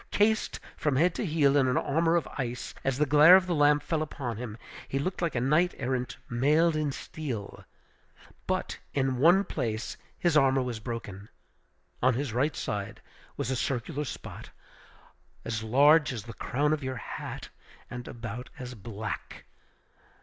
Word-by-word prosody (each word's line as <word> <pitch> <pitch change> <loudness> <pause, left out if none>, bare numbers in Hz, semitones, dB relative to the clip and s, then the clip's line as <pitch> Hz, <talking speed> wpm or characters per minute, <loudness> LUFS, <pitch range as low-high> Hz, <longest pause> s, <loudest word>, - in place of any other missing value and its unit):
Cased 215 +1 +1 0.2
from 150 -3 0
head 165 +6 +3
to 215 - -3
heel 150 -3 +3
in 135 -2 +4
an 125 - +1
armor 165 +4 +2
of 170 - +1
ice, 125 -2 -4
as 135 -1 0
the 150 - +3
glare 150 +5 +8
of 190 -1 +4
the 180 - -1
lamp 145 -1 +4
fell 160 -2 -1
upon 130 -7 -4
him, 115 -2 -6 0.3
he 135 - -2
looked 180 +8 -2
like 170 -5 -1
a - - +2
knight 150 +8 +2
errant 125 -1 -2
mailed 150 +7 +3
in 155 -2 0
steel. 130 -8 -6 0.8
But - - -2 0.2
in 130 -2 +1
one 175 +7 +6
place 110 - -3 0.2
his 170 -3 +1
armor 135 -2 +4
was 120 -3 -4
broken. 105 -4 -6 0.7
On 130 -1 +4
his 135 -3 -2
right 140 +6 +1
side 105 +1 -4 0.4
was 130 - -2
a - - 0
circular 135 +4 -2
spot, 120 - -8 1.0
as 110 -1 -2
large 145 +8 +5
as 115 -5 -5
the 115 0 -9
crown 145 +7 0
of 155 - -1
your 130 -1 -3
hat, - - -7 0.4
and 120 0 -7
about 115 +1 -7
as 125 -2 -7
black! 105 -1 -6
135 Hz, 165 wpm, -28 LUFS, 120-155 Hz, 1.0 s, glare